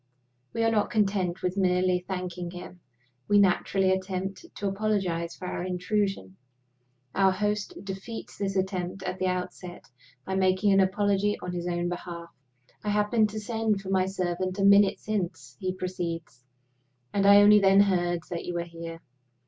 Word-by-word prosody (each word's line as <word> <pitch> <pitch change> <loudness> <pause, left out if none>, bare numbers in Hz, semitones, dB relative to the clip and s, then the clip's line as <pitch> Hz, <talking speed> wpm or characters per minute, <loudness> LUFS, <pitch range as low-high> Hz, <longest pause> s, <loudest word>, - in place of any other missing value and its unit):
We 230 - 0
are 225 - +3
not 210 -2 +1
content 195 -5 0
with 180 +1 -1
merely 180 -1 +2
thanking 180 -1 -5
him; 180 0 -10 0.5
we 205 - +4
naturally 195 0 +3
attempt 190 - -3
to 200 - -3
apologize 195 -5 -1
for 185 - -9
our - - -3
intrusion. 180 - -2 0.8
Our 195 -1 +4
host 210 +1 -2
defeats 195 +4 -7
the 200 - 0
attempt 185 0 -3
at 185 0 -4
the 185 - +1
outset 180 -1 -4 0.4
by 190 - -3
making 190 +1 +3
an 195 - +5
apology 200 +1 +2
on 180 - -4
his 175 0 -3
own 175 0 -1
behalf. 175 -1 -6 0.5
"I 210 - -2
happened 210 +1 +2
to 215 +1 -5
send 220 -2 -1
for 195 0 -6
my 190 -1 +2
servant 185 0 -2
a 195 - 0
minute 200 0 +6
since," 175 -11 -4
he 185 - -1
proceeds, 170 -8 -5 0.7
"and 200 -1 +2
I 200 - +9
only 210 0 +8
then 195 0 +6
heard 175 -3 +1
that 170 - -3
you 175 - -4
were 170 - -1
here. 165 -1 -8
190 Hz, 165 wpm, -27 LUFS, 180-200 Hz, 0.8 s, I